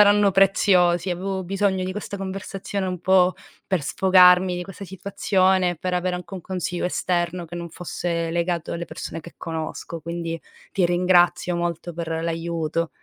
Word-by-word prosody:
saranno 205 0 +6
preziosi, 185 -2 +4
avevo 190 +2 -2
bisogno 195 0 0
di 185 - -3
questa 205 0 -5
conversazione 195 0 -4
un 180 -2 -4
po' 185 0 +4 0.3
per 185 -6 0
sfogarmi 180 +1 +5
di 180 - -3
questa 195 +1 -9
situazione, 190 -1 +1
per 180 +3 -2
avere 180 0 0
anche 180 +2 -8
un 185 - -5
consiglio 180 0 -3
esterno 175 -1 -1
che 170 - -10
non 170 0 -5
fosse 170 0 -3
legato 170 0 -1
alle 170 0 -3
persone 165 - -6
che 170 - -13
conosco, 165 0 -5
quindi, 165 0 -4 0.3
ti 185 - +2
ringrazio 175 0 +3
molto 170 0 -3
per 165 0 -5
l'aiuto. 165 0 -2
180 Hz, 155 wpm, -23 LUFS, 170-190 Hz, 0.3 s, saranno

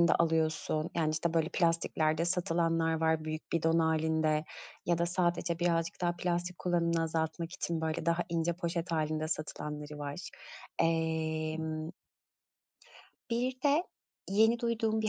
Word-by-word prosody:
poşetinde 170 - +5
alıyorsun? 160 -1 +1
Yani, 160 -2 +2
işte, 165 +1 -1
böyle, 160 -1 +2
plastiklerde 165 -2 +1
satılanlar 165 -2 +1
var, 160 -1 +2
büyük 155 0 -5
bidon 165 0 +3
hâlinde 160 -1 +2 0.4
ya 170 0 +2
da 170 - +2
sadece 175 -1 0
birazcık 170 -1 0
daha 175 -1 +1
plastik 175 0 -1
kullanımını 170 -2 +1
azaltmak 160 +1 -2
için, 170 -3 -2
böyle, 160 +1 -2
daha 170 +1 +2
ince 170 0 +1
poşet 170 0 -3
hâlinde 155 0 0
satılanları 150 -1 -5
var. 145 +4 -5 0.5
Emm 160 -1 0 1.4
Bir 250 +2 -1
de 290 +3 +4 0.5
yeni 220 +4 +4
duyduğum 225 -2 0
bir 215 - +1
165 Hz, 130 wpm, -32 LUFS, 160-175 Hz, 1.4 s, poşetinde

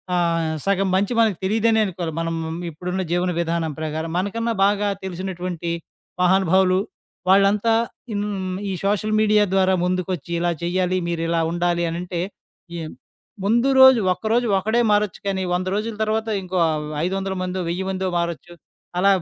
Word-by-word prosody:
ఆహ్, 165 -2 +1
సగం 195 0 +2
మంచి 200 +5 +1
మనకు 220 -6 +3
తెలియదనే 220 +3 +2
అనుకోవాలి. 170 -3 -4
మనం 165 0 -2 0.3
ఇప్పుడున్న 180 +4 -4
జీవన 180 +1 +1
విధానం 165 -1 -1
ప్రకారం. 160 +1 -3
మనకన్నా 230 +5 -1
బాగా 205 0 +2 0.2
తెలిసినటువంటి 180 -2 -4 0.5
మహానుభావులు, 185 0 +4 0.5
వాళ్ళంతా 200 +3 +4 1.0
ఈ - - -2
సోషల్ 210 +1 +1
మీడియా 210 -1 +4
ద్వారా 190 -1 +3
ముందుకొచ్చి 180 -3 -2
ఇలా 175 0 +1
చెయ్యాలి, 185 +1 0
మీరిలా 165 0 0
ఉండాలి 175 0 0
అనంటే 175 +1 -4 0.6
ఈ - - -4 0.7
ముందు 235 +6 +3
రోజు 265 -2 +9
ఒక్కరోజు 225 +5 0
ఒక్కడే 220 +5 +1
మారొచ్చు 205 -1 +1
గానీ, 190 -1 -1
100 180 +1 -1
రోజుల 215 +2 -2
తరువాత 220 +1 -1 0.2
ఇంకో 185 0 -3 0.5
500ల 190 +1 -2
మందో 185 0 -3
1000 185 +3 -2
మందో 190 0 -2
మారొచ్చు. 170 0 -3 0.5
అలా 200 +1 +5
185 Hz, 135 wpm, -22 LUFS, 175-205 Hz, 1.0 s, రోజు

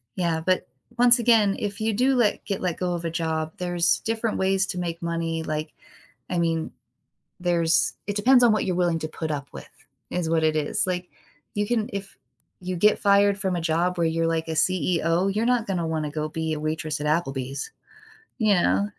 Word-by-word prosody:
Yeah, 170 -3 0
but 185 -1 +1 0.3
once 240 0 +6
again, 225 -4 +4
if 205 0 -4
you 220 0 +1
do 255 +5 +2
let 235 -4 +2
get 195 - -3
let 180 -3 -1
go 180 -1 -1
of 170 -1 -4
a - - 0
job, 160 -1 -2
there's 175 -1 +1
different 225 0 -2
ways 190 0 +2
to 180 - -5
make 170 -1 -3
money, 165 -1 -2
like, 155 0 -4 0.6
I 180 - 0
mean, 165 -1 0 0.7
there's 170 -3 +2
it 205 - -2
depends 245 +4 +5
on 235 - +6
what 215 - +1
you're 185 - -1
willing 175 -2 +1
to 155 - -3
put 155 0 -5
up 140 -2 -4
with, - - -10 0.4
is 175 -2 -1
what 165 -1 +2
it 155 0 +2
is, 150 -1 0
like, 180 -1 -3 0.5
you 205 0 +1
can 225 -1 0
if 200 -1 -6 0.5
you 185 0 -3
get 210 +4 +3
fired 200 0 +4
from 190 -3 -1
a 175 - -2
job 170 +2 0
where 170 -1 +2
you're, 165 0 0
like, 165 0 -1
a - - -3
CEO, 170 +2 +1
you're 215 +3 0
not 245 -2 +2
gonna 175 -4 -1
wanna 155 -2 -2
go 155 0 -3
be 160 0 -2
a 155 - -3
waitress 155 -1 -3
at 150 - -1
Applebee's, 135 -3 -2 0.7
you 215 -4 +3
know? 200 +2 +2
175 Hz, 205 wpm, -25 LUFS, 160-200 Hz, 0.7 s, once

